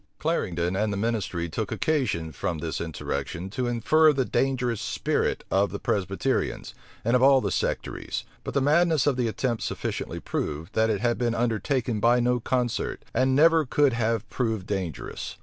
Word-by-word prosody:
Clarendon 90 - -1
and 105 +2 0
the 100 - -2
ministry 100 -6 -1
took 100 +5 -4
occasion, 125 - 0
from 80 +3 -3
this 80 +1 -4
insurrection, 85 +2 -4
to 125 +3 -2
infer 155 +7 +4
the 135 -3 0
dangerous 125 -5 0
spirit 105 - -1
of 100 +1 +3
the 100 - -4
Presbyterians, 100 +7 -1 0.3
and 115 +2 +3
of 125 - +3
all 135 0 +7
the - - -2
sectaries: - - -2 0.2
but - - -6
the 140 - +3
madness 155 +1 +3
of 145 - +3
the 125 -2 0
attempt 115 +1 -1
sufficiently - - -3
proved, 80 +7 -4
that 110 0 +2
it 105 -3 0
had 120 0 +1
been 120 -1 0
undertaken 120 +1 0
by 120 +3 +4
no 125 0 +2
concert, 125 0 -1
and 130 +2 +2
never 160 +2 +5
could 145 0 +2
have 115 -2 0
proved 110 -6 -1
dangerous. 95 -6 -4
115 Hz, 170 wpm, -26 LUFS, 100-130 Hz, 0.3 s, all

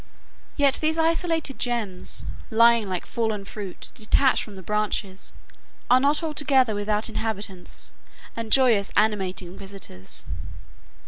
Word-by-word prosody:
Yet 280 -2 +5
these 315 +1 +1
isolated 325 -3 +1
gems, 225 -7 -2 0.2
lying 230 -2 +5
like 185 -2 -3
fallen 220 -4 -2
fruit 200 -2 -7
detached 255 +5 +3
from 210 - -8
the 190 - -10
branches, 210 -1 -2 0.6
are 250 - +7
not 290 +4 +2
altogether 275 -6 +2
without 210 +1 0
inhabitants 205 -5 -3 0.4
and 230 -1 -5
joyous, 230 -7 +4
animating 190 -4 0
visitors. 195 - -8
220 Hz, 115 wpm, -25 LUFS, 200-265 Hz, 0.6 s, are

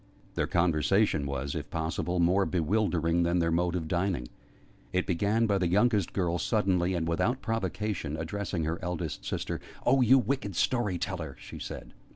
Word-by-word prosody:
Their - - 0
conversation 85 -1 +2
was, 70 0 -3
if 75 -3 -5
possible, 80 +2 -2
more 90 +3 +3
bewildering 85 -2 +1
than 85 +1 +2
their 85 -1 +2
mode 85 +1 +1
of 80 -3 -2
dining. 85 -8 -1 0.6
It 90 0 +1
began 105 +5 +1
by 100 -3 +2
the 90 - +1
youngest 105 0 +2
girl 85 -3 0
suddenly, 95 -2 +1
and 80 -2 -1
without 120 +10 0
provocation, 100 -7 -2
addressing 90 +1 -3
her 80 +4 -2
eldest 90 -3 -4
sister. - - -3 0.2
"Oh, 135 +1 +4
you 125 +2 +6
wicked 125 -5 -1
story 105 -6 +1
teller!" 85 -6 -4
she - - -9
said. - - -7
90 Hz, 165 wpm, -29 LUFS, 80-100 Hz, 0.6 s, you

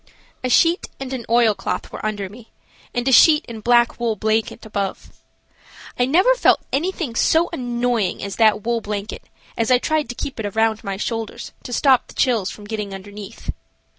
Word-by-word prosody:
A 255 - 0
sheet 335 +7 +3
and 270 -1 -5
an 245 -4 -5
oilcloth 230 -3 +1
were - - -8
under 205 -2 -2
me, 225 +4 -14 0.4
and 245 +1 -2
a - - +3
sheet 305 +4 +6
and 225 -2 -8
black 240 0 +3
wool 230 -2 0
blanket 220 +2 -1
above. 200 -3 -4 0.9
I 245 - +3
never 370 - +4
felt - - +3
anything 325 -3 -1
so 325 +8 +2
annoying 240 - -1
as 200 0 -5
that 215 -2 +4
wool 235 0 0
blanket 205 0 -5 0.3
as 225 -1 0
I 250 - +6
tried 310 +3 -1
to 245 - -5
keep 270 - -5
it 220 - -3
around 220 -1 +2
my 195 -1 -4
shoulders 225 +1 -4
to - - -9
stop 260 +1 +3
the - - -15
chills 230 -7 +1
from 210 - -10
getting 205 -2 -4
underneath. 205 +2 -8
230 Hz, 180 wpm, -21 LUFS, 215-255 Hz, 0.9 s, sheet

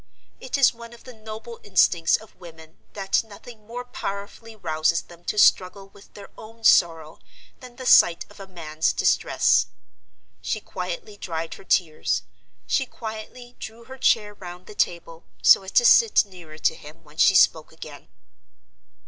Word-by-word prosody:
It 260 - -4
is 275 -2 +4
one 235 0 -12
of 235 - -16
the 255 - -12
noble 220 +1 -10
instincts 175 -4 +2
of 220 - -17
women 160 -2 -14 0.2
that 195 +1 0
nothing 215 0 -15
more 245 +2 -7
powerfully 220 -1 -7
rouses 160 -3 0
them 170 0 -17
to - - -3
struggle 195 0 +3
with 195 - -20
their 200 -1 -12
own 225 +1 -14
sorrow 165 -6 +3 0.4
than 250 -1 -13
the 255 - -9
sight 175 -7 +5
of 205 - -18
a 195 - -10
man's 160 -3 -2
distress. - - +2 0.7
She 215 - -3
quietly 185 +1 -7
dried 165 -3 -5
her - - -13
tears; 165 -5 0 0.4
she 265 - 0
quietly 235 +2 -9
drew 225 +2 -9
her 260 +2 -12
chair 210 -3 +2
round 180 -2 -11
the - - -12
table, 170 -3 -3 0.2
so - - +7
as 190 0 -9
to 240 - +4
sit 445 - +5
nearer 175 -6 -13
to 160 - +1
him 160 +1 -14
when 150 0 -20
she 190 - +5
spoke 160 -3 +3
again. 155 -3 -12
195 Hz, 165 wpm, -23 LUFS, 165-225 Hz, 0.7 s, so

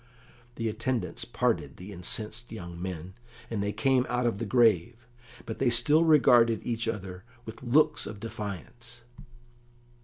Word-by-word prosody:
The 115 0 -2
attendants 110 -2 -2
parted 115 - -1
the 95 +3 -9
incensed 110 +6 -5
young 85 -6 -8
men, 90 0 -6 0.4
and 110 -3 -1
they 100 0 -1
came 125 +4 +2
out 125 0 0
of 115 -4 0
the 115 - -3
grave, 115 -2 +3 0.5
but 110 - -6
they 135 - +3
still 145 +8 +5
regarded 120 -8 +5
each 115 -1 -2
other 95 -5 -5 0.2
with 110 0 -9
looks 150 +4 +2
of 105 - -8
defiance. 115 +3 -8
115 Hz, 145 wpm, -28 LUFS, 100-120 Hz, 0.5 s, still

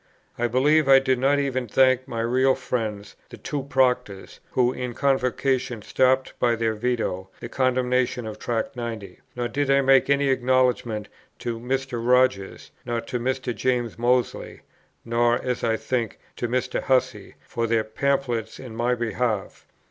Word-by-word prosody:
I 120 - 0
believe 140 +5 +3
I 135 0 +8
did 130 -1 +1
not 140 +2 +3
even 130 -3 -1
thank 130 +2 +3
my 115 -1 -3
real 130 +3 +2
friends, 110 -6 -4
the - - -11
two 145 - -4
Proctors, 125 -7 -1
who 125 0 +2
in 125 -2 -5
Convocation 130 -3 0
stopped 130 +2 +2
by 120 -1 +2
their 115 -1 0
Veto 110 -5 -2
the - - -6
condemnation 125 -1 0
of 110 -1 -7
Tract 120 +3 -2
90; 115 -6 -6 0.2
nor 120 -1 -2
did 140 +2 -2
I 140 0 +4
make 135 0 +4
any 140 0 +3
acknowledgment 125 -4 +1 0.3
to 120 -2 -4
Mr. 130 -1 -3
Rogers, 125 -5 +1
nor 120 -1 -2
to 120 +2 -4
Mr. 130 0 -2
James 120 -3 -1
Mozley, 125 +1 0 0.4
nor, 120 +1 +2
as 125 -2 -3
I 115 -1 +1
think, 120 -4 -2 0.2
to 120 - -2
Mr. 125 +2 -1
Hussey, 130 -2 0
for 115 -1 -2
their 115 -1 +1
pamphlets 120 -1 -2
in 125 -4 -9
my 120 +2 +1
behalf. 115 -3 -3
125 Hz, 155 wpm, -24 LUFS, 115-130 Hz, 0.4 s, I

